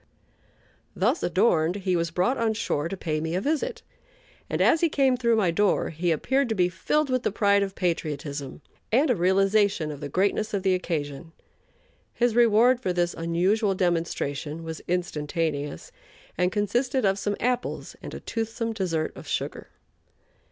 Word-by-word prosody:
Thus - - +1
adorned 175 -2 +2
he 190 -2 -1
was 170 -1 0
brought 180 +10 +1
on 225 -1 +1
shore 165 -8 -1
to 195 - -5
pay 155 -4 -2
me 160 +1 -2
a - - +1
visit, 320 - -2 0.7
and - - -2
as 325 - +4
he 335 - +3
came 270 -3 +3
through 235 -2 +2
my 195 -6 +2
door 205 +4 +1
he 170 +2 -1
appeared 265 - +1
to 220 - 0
be 180 -2 +2
filled 295 - 0
with 255 -1 +1
the - - -1
pride 200 -1 +3
of 195 -1 -2
patriotism 150 -5 -3 0.3
and 265 +5 +4
a - - +3
realization 195 -2 +2
of 145 - -8
the 145 - -5
greatness 200 +6 0
of 195 - -2
the 190 -1 +3
occasion. 165 -3 -3 0.8
His 240 -1 +2
reward 240 +1 +5
for 215 -8 -1
this 175 -1 0
unusual 190 +5 +1
demonstration 165 -4 -2
was 160 -1 -6
instantaneous, 155 - -2 0.4
and 180 +1 +1
consisted 240 +5 0
of 195 0 +2
some 205 +1 -1
apples 250 0 -2
and - - -7
a - - -6
toothsome 225 0 -3
dessert 175 -7 -2
of - - -11
sugar. - - -3
190 Hz, 165 wpm, -26 LUFS, 165-225 Hz, 0.8 s, reward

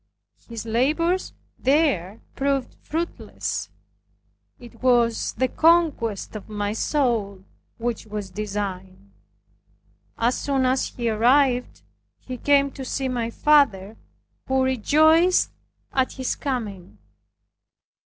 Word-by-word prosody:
His 230 -1 -6
labors 310 +11 +1 0.3
there 260 - +1
proved 275 -1 -1
fruitless. 335 +3 -4 0.9
It 235 -2 -14
was 240 -3 +2
the 260 - 0
conquest 310 - +2
of 215 0 -8
my 205 -1 -2
soul 220 -7 -1 0.3
which 235 -1 -3
was 205 -2 -6
designed. 190 - -5 1.1
As 240 +2 +1
soon 270 -2 0
as 255 +1 +1
he 240 -1 -4
arrived 250 +3 +2 0.4
he 255 -1 -7
came 280 -1 +3
to 270 - -8
see 265 +1 -2
my 240 -2 -2
father 230 -8 +3 0.5
who 265 0 +2
rejoiced 315 +8 +4 0.4
at 260 -1 +1
his 260 -1 -2
coming. 215 -10 -5
250 Hz, 100 wpm, -23 LUFS, 215-280 Hz, 1.1 s, rejoiced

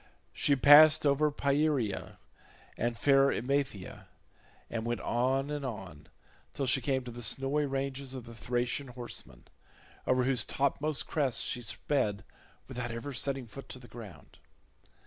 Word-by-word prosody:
She 140 - +2
passed 150 +3 +8
over 145 +2 +3
Pieria 140 -6 0 0.6
and 120 0 -2
fair 140 +1 +4
Emathia, 130 -6 -2 0.6
and 115 -1 -4
went 120 +1 -2
on 135 +4 0
and 145 -1 -3
on 95 - -7 0.5
till 140 - -1
she 130 +1 +2
came 130 0 0
to 125 - -7
the 120 +1 -8
snowy 135 +5 0
ranges 135 0 -3
of 125 -3 -7
the 115 - -10
Thracian 120 +4 -2
horsemen, 120 - -9 0.6
over 130 0 +3
whose 130 -1 +2
topmost 140 -1 -1
crests 135 -7 0
she 120 - -3
sped 110 -3 -1 0.4
without 125 -2 -4
ever 115 +5 -5
setting 135 0 -1
foot 135 +4 -11
to 130 - -8
ground. 110 -5 -12
130 Hz, 140 wpm, -31 LUFS, 120-140 Hz, 0.6 s, passed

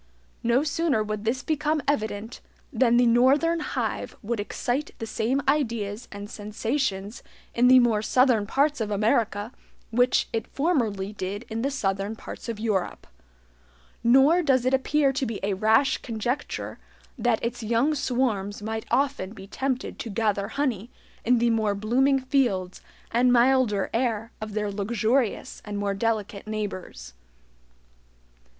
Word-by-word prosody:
No 240 +4 +2
sooner 305 -6 +1
would 215 0 -4
this 255 +4 -1
become 310 0 0
evident 220 -4 -2 0.3
than 240 -2 +3
the 245 - +5
NORTHERN 270 +8 +4
HIVE 300 - -3
would 230 +1 -2
excite 245 +7 -3
the 225 - -5
same 240 +5 -1
ideas 230 -6 0
and 205 0 -7
sensations 215 0 -3 0.3
in 245 +1 +4
the 255 +1 +8
more 235 -4 +4
southern 240 -2 +3
parts 285 +1 +1
of 215 - -1
America 210 +1 0 0.4
which 245 +2 +3
it 225 -2 -2
formerly 225 - -1
did 200 +3 -5
in 225 0 -3
the 275 - 0
southern 200 -5 -2
parts 230 - -9
of 225 -2 -4
Europe. 215 -5 -2 1.0
Nor 270 +9 +5
does 265 -6 +2
it 255 - +2
appear 275 +1 +2
to 270 +1 -2
be 230 -4 -3
a 200 0 0
rash 220 +7 +3
conjecture 240 +5 -4 0.4
that 240 -2 +1
its 235 +1 -3
young 235 +7 +1
swarms 240 -7 -1
might 220 +1 -4
often 260 -6 0
be 195 -2 -10
tempted 260 +5 -3
to 230 - -5
gather 205 -1 0
honey 245 -6 -2 0.3
in 245 +1 +3
the 235 0 +2
more 215 -2 +1
blooming 255 +7 +2
fields 245 -9 0 0.3
and 245 +2 +3
milder 245 -4 +3
air 230 -2 -1
of 215 -1 -6
their 210 -1 -1
luxurious 220 +4 -1
and 205 -1 -5
more 200 -1 -1
delicate 210 -1 -2
neighbors. 185 - -5
230 Hz, 145 wpm, -26 LUFS, 210-260 Hz, 1.0 s, the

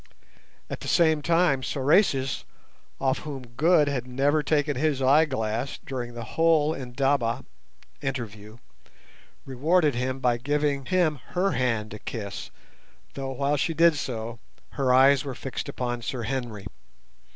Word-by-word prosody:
At - - -6
the - - -8
same 160 -3 +3
time 165 -3 +2
Sorais, 135 -1 +2 0.6
off 135 -1 +1
whom 140 -4 -7
Good 150 +5 +3
had 130 -3 -2
never 140 +4 +1
taken 145 -1 +1
his 145 +1 0
eyeglass 130 -4 +1
during 120 -3 -5
the 120 - -5
whole 160 +4 +2
indaba 130 -2 -1 0.6
[interview], 115 -6 -5 0.9
rewarded 150 +4 +2
him 130 +2 -2
by 125 -2 +2
giving 145 +1 -1
him 165 -6 +1 0.2
her 195 +2 +2
hand 115 -4 -1
to 105 - -7
kiss, 100 -3 -6 0.6
though, 135 -1 -4
while 140 +2 0
she 165 +4 -1
did 165 0 +5
so, 115 -4 -4 0.3
her 135 -2 0
eyes 135 +2 +6
were 135 -3 -5
fixed 135 - -5
upon 120 -1 -3
Sir 120 +1 -4
Henry. 115 -4 -4
135 Hz, 135 wpm, -26 LUFS, 120-150 Hz, 0.9 s, eyes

